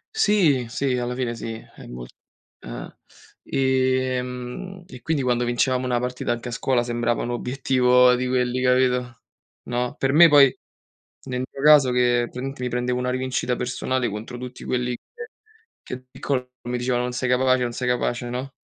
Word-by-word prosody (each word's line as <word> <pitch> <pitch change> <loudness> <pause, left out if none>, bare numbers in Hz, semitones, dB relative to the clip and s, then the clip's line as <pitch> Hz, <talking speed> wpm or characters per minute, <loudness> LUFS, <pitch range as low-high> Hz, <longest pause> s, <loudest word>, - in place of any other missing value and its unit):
Sì, 185 - +3
sì, 125 +2 -1
alla 125 0 -2
fine 125 -2 -2
sì. 115 0 -5 0.2
E - - -11
mol - - -8 0.5
eh. - - -8 0.5
Ehm, 130 +6 -1
e 125 -7 -12
quindi 155 0 0
quando 125 -1 +1
vincevamo 125 +2 +1
una 125 -1 0
partita, 125 0 -2
anche 120 +1 -4
a - - -4
scuola 125 +1 +1
sembrava 120 0 -1
un 120 - -3
obiettivo 125 0 +3
di 125 +1 -1
quelli, 125 0 0
capito, 125 -1 +1 0.4
no. 125 0 -2
Per 135 0 +1
me 170 +3 +8
poi, 140 -3 +6 0.7
nel 125 -1 -3
mio 135 - -8
caso, 145 -3 +7
che 120 -1 +3
praticamente 130 +2 -6
mi 125 - -1
prendevo 125 +1 -1
una 125 0 -1
rivincita 130 -1 -1
personale 125 0 -1
contro 110 +4 -6
tutti 125 0 -8
quelli 125 0 -1
che - - -41 0.8
che - - -6
da 130 - -16
piccolo 130 -1 -3 0.2
mi 125 0 -1
dicevano: 125 0 0
"Non 125 - -3
sei 125 +1 -2
capace, 130 0 +3
non 120 -1 -1
sei 125 +1 -3
capace", 120 0 -1
no? 125 +3 -5
125 Hz, 175 wpm, -23 LUFS, 125-130 Hz, 0.8 s, me